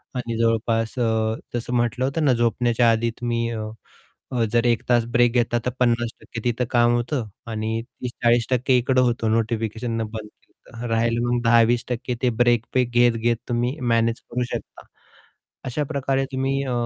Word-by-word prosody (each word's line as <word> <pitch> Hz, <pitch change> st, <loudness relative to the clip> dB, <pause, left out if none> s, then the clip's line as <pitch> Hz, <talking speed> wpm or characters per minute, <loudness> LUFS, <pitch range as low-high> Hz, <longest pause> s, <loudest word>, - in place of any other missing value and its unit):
आणि 120 Hz, -2 st, -3 dB
जवळपास 115 Hz, +1 st, 0 dB
अ, 110 Hz, -1 st, +1 dB, 0.2 s
जसं 120 Hz, +1 st, -3 dB
म्हटलं 120 Hz, +2 st, +1 dB
होतं 150 Hz, +4 st, 0 dB
ना 135 Hz, -, +5 dB
झोपण्याच्या 120 Hz, 0 st, +2 dB
आधी 115 Hz, +1 st, +1 dB
तुम्ही 115 Hz, -1 st, -1 dB
अ, 110 Hz, -2 st, -4 dB, 0.7 s
अ, 125 Hz, -3 st, +1 dB
जर 120 Hz, 0 st, +3 dB
1 120 Hz, -2 st, +2 dB
तास 120 Hz, -2 st, +4 dB
ब्रेक 120 Hz, -1 st, +4 dB
घेता, 120 Hz, -1 st, +1 dB
तर -, -, +2 dB
50% 120 Hz, -1 st, -1 dB
तिथं 120 Hz, +1 st, 0 dB
काम 120 Hz, -1 st, +4 dB
होतं 120 Hz, 0 st, -2 dB, 0.2 s
आणि 110 Hz, +1 st, -2 dB
30-40% 120 Hz, +1 st, +1 dB
इकडं 130 Hz, +1 st, +2 dB
होतं 120 Hz, -3 st, +1 dB
नोटिफिकेशन 115 Hz, +1 st, -1 dB
बंद 110 Hz, -1 st, -5 dB
केलं 115 Hz, +2 st, -16 dB
तर, 120 Hz, -, -3 dB
राहिलं 115 Hz, +1 st, +1 dB
मग 120 Hz, -, +1 dB
10-20% 120 Hz, +1 st, +2 dB
ते 125 Hz, -, +3 dB
ब्रेक 120 Hz, -1 st, +2 dB
पे 130 Hz, -, +4 dB
घेत-घेत 120 Hz, -1 st, +2 dB
तुम्ही 120 Hz, +2 st, 0 dB
मॅनेज 115 Hz, -2 st, +1 dB
करू 125 Hz, -, 0 dB
शकता. -, -, -7 dB, 0.8 s
अशाप्रकारे 135 Hz, 0 st, -1 dB
तुम्ही 135 Hz, +1 st, 0 dB
अ, 130 Hz, -, -3 dB
120 Hz, 155 wpm, -23 LUFS, 115-125 Hz, 0.8 s, ना